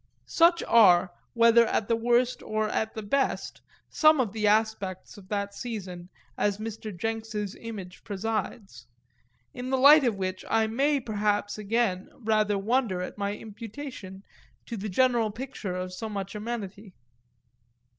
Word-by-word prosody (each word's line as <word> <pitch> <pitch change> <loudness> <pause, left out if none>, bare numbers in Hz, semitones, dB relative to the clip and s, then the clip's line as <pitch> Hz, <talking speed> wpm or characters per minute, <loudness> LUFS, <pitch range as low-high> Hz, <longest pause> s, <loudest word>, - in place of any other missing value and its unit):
Such 340 +1 +3
are, 185 -6 +5 0.2
whether 230 0 +5
at 210 - -1
the 230 - +2
worst 240 +2 +1
or 215 0 -1
at 220 +1 -2
the 220 - -5
best, 270 +7 -1 0.3
some 310 -2 +4
of 225 -6 0
the 215 -1 0
aspects 210 -3 0
of 200 -2 -14
that 200 0 -3
season 185 -8 -7 0.3
as 205 -1 +1
Mr. 220 0 -6
Jenks's 220 0 -3
image 200 -6 -8
presides; 205 - -4 0.7
in 250 +1 -6
the 265 - +1
light 285 +3 +8
of 235 -5 +1
which 185 -1 -3
I 225 0 +3
may 275 +6 +1
perhaps 210 -3 -1
again 210 -3 -1
rather 215 -3 +1
wonder 205 -3 0
at 195 - -8
my 200 0 -1
imputation 220 -3 -9 0.4
to 235 - -6
the 210 0 -5
general 240 +1 +2
picture 215 -5 -6
of 185 0 -4
so 220 +4 -5
much 195 -1 -5
amenity. 210 -3 -6
215 Hz, 145 wpm, -27 LUFS, 200-235 Hz, 0.7 s, light